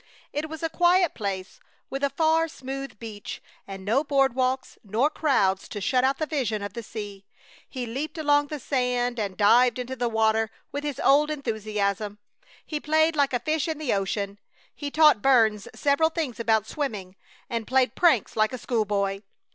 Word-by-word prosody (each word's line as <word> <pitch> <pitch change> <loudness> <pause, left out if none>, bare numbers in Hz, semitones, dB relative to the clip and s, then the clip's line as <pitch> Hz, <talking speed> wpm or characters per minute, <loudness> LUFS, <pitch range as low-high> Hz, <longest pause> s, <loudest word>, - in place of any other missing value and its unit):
It 300 +2 -3
was 315 0 -7
a 325 - 0
quiet 355 0 +3
place, 190 -3 -5 0.3
with 270 +1 -4
a 280 - +3
far, 320 +3 +2
smooth 270 -4 -7
beach, 210 -2 -7 0.3
and 195 -1 -8
no 240 +8 +2
board 275 -3 +2
walks 260 +1 -1
nor 230 +8 +1
crowds 195 -11 +1
to 210 - -5
shut 250 +6 +1
out 265 +1 +2
the 310 - -1
vision 245 -9 -2
of 205 - -5
the 235 - -5
sea. 205 -3 -8 0.5
He 255 -2 -4
leaped 275 +8 -5
along 290 -2 +3
the 300 - -5
sand 250 -2 -1
and 200 -3 -3
dived 240 +5 +5
into 250 +1 -4
the 245 -1 -1
water 220 0 +2 0.2
with 285 +1 -4
his 290 -3 -4
old 295 +2 +4
enthusiasm. 215 -6 -2 0.5
He 300 - -3
played 315 +2 +2
like 285 -2 +2
a 245 - 0
fish 310 +3 0
in 320 -2 -2
the 300 -5 -1
ocean. 200 0 -2 0.3
He 290 - -5
taught 300 -7 +5
Burns 220 -6 +3
several 290 +2 +2
things 310 -9 -3
about 220 -2 +2
swimming, 210 -12 -4 0.3
and 230 -2 -3
played 260 0 +2
pranks 320 - +3
like 215 +2 +2
a - - -3
school 230 -2 -1
boy. 200 -1 -1
250 Hz, 185 wpm, -26 LUFS, 215-290 Hz, 0.5 s, dived